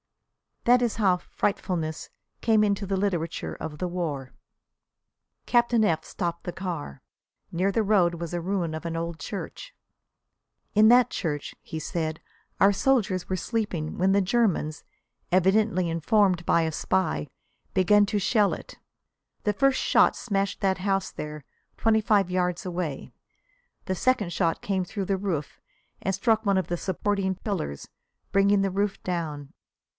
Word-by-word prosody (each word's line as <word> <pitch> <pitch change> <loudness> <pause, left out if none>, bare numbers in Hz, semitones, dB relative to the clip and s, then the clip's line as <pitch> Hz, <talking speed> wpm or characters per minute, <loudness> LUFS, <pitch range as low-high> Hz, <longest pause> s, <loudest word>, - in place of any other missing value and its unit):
That 245 +1 +5
is 235 - 0
how 190 -5 +3
"frightfulness" 170 -4 -2 0.3
came 220 -2 +4
into 200 -1 0
the 195 0 -1
literature 180 -4 -2
of 150 -1 -6
the 180 - -1
war. 155 -7 -3 1.2
Captain 240 -2 +3
F 165 -6 +1
stopped 170 -1 -4
the 175 - -4
car. 170 - -5 0.5
Near 185 +4 +1
the 225 - +1
road 190 -5 +3
was 170 -1 -5
a 175 - -1
ruin 175 -3 -1
of 160 - -7
an 165 -1 -3
old 165 0 -4
church. - - -7 1.0
"In 215 +1 +7
that 245 0 +6
church," 150 -5 -3
he 160 - -6
said, 160 -1 -3 0.4
"our 200 +1 +6
soldiers 200 -5 +1
were 185 - 0
sleeping 185 -6 -2
when 190 +2 +3
the 200 +1 +4
Germans, 185 -7 0 0.5
evidently 190 0 +3
informed 180 +2 +2
by 170 - +3
a 160 - -1
spy, 155 - 0 0.5
began 205 +2 +5
to 205 - 0
shell 205 +1 +2
it. - - -9 0.7
The 210 - +1
first 275 +5 +2
shot - - +4
smashed 200 -4 -2
that 190 -1 +1
house 195 0 0
there, 150 -1 -7 0.3
twenty 220 0 +3
five 200 -3 +3
yards 180 +1 -1
away; 175 -6 -4 0.7
the 185 - -1
second 220 -4 +1
shot 165 -3 0
came 190 -2 -1
through 195 +2 -4
the 195 0 0
roof 170 -7 -3 0.4
and 195 - -1
struck 220 +3 +2
one 200 -1 +3
of 190 - 0
the 175 - -2
supporting 190 +1 -1
pillars, 180 - -4 0.4
bringing 200 0 +4
the 195 -1 0
roof 200 +1 -1
down. 155 -6 -4
190 Hz, 150 wpm, -26 LUFS, 170-205 Hz, 1.2 s, In